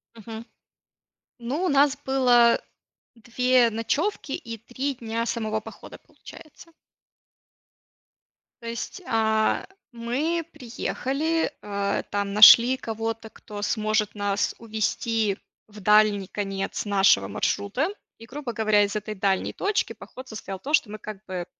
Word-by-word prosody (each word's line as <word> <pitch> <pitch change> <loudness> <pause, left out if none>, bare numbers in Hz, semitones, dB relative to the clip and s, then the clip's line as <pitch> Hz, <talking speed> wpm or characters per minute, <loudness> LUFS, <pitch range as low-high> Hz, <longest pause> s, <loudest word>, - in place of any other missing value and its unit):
Мгм. 225 +1 -9 0.9
Ну, 260 +10 -3
у - - +2
нас 280 0 +4
было 245 -3 +4 0.5
2 245 +1 +2
ночевки 280 - -2
и 230 -3 -5
3 255 +5 -4
дня 230 -1 -3
самого 220 -2 -2
похода, - - -12
получается. 330 +2 -15 1.9
То 230 - -8
есть, 235 +10 -5
а, 220 -1 +1 0.3
мы 280 +9 -1
приехали, 275 +6 -2
а, 200 -1 -2
там 200 -1 -3
нашли 235 +4 +9
кого-то, 225 0 -4
кто 205 -1 -10
сможет 215 0 0
нас 205 0 -1
увезти 220 -1 -1 0.3
в 210 0 -13
дальний 210 -1 +4
конец 195 -1 -3
нашего 195 - +4
маршрута. 205 - -1 0.3
И, 230 - -12
грубо 260 0 -6
говоря, 215 -2 +3
из 200 +1 -2
этой 210 0 -5
дальней 190 -1 0
точки 415 +1 -1
поход 255 +1 -12
состоял 195 -4 -7
то, 290 +9 -6
что 235 - +3
мы 215 - -6
как 210 -1 -9
бы 180 -2 -5
225 Hz, 125 wpm, -25 LUFS, 210-250 Hz, 1.9 s, нашли